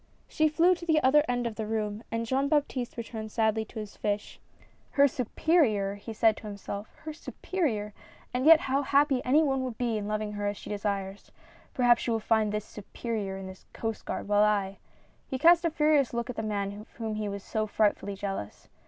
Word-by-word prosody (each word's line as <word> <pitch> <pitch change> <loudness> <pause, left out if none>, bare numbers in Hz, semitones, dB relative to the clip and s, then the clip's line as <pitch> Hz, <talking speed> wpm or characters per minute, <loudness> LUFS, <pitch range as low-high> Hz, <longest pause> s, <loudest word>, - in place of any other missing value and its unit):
She 310 0 +2
flew 335 +4 +4
to 345 -1 -7
the 315 -2 +4
other 290 +3 +5
end 245 0 0
of 230 -2 -4
the 220 -1 -3
room 215 -1 -2
and 230 0 -1
Jean 265 +4 +1
Baptiste 280 -6 -1
returned 220 -2 -6
sadly 220 -1 +1
to 225 - -13
his 210 -2 -6
fish. 205 0 -3 0.3
" - - -35
Her 280 0 +7
superior 250 - +1
1 200 - -7
" - - -18
he 225 - -7
said 220 0 +3
to 215 - -9
himself. 200 0 -6
" - - -23
Her 310 -1 -5
superior! 255 - -3 0.4
And 255 +4 +1
yet 325 0 +9
how 270 +1 0
happy 280 -1 +2
any 295 +5 +4
one 270 -3 0
would 250 -4 -5
be 235 -3 0
in 205 - -5
loving 215 0 -2
her 205 0 -3
as 205 0 -2
she - - -9
desires. 200 -1 -3 0.2
— - - -27
Perhaps 245 -2 +4
she - - -2
will 225 -1 +1
find 220 -1 +1
this 210 0 -3
superior 210 -1 -5
in 195 - -7
this 190 0 -11
Coast 225 -1 -4
Guard, - - -4
while 205 0 +3
I 200 -2 +1
— - - -33
" - - -37
He 260 - -2
cast 340 +4 +6
a - - +3
furious 300 -5 +2
look 235 +1 -2
at - - -11
the - - -2
man 205 -1 -3
of 215 - -16
whom 225 -2 -4
he 215 -1 -3
was 200 0 -6
so 215 -1 -2
frightfully 205 -1 0
jealous. 195 - -6
220 Hz, 230 wpm, -28 LUFS, 205-265 Hz, 0.4 s, yet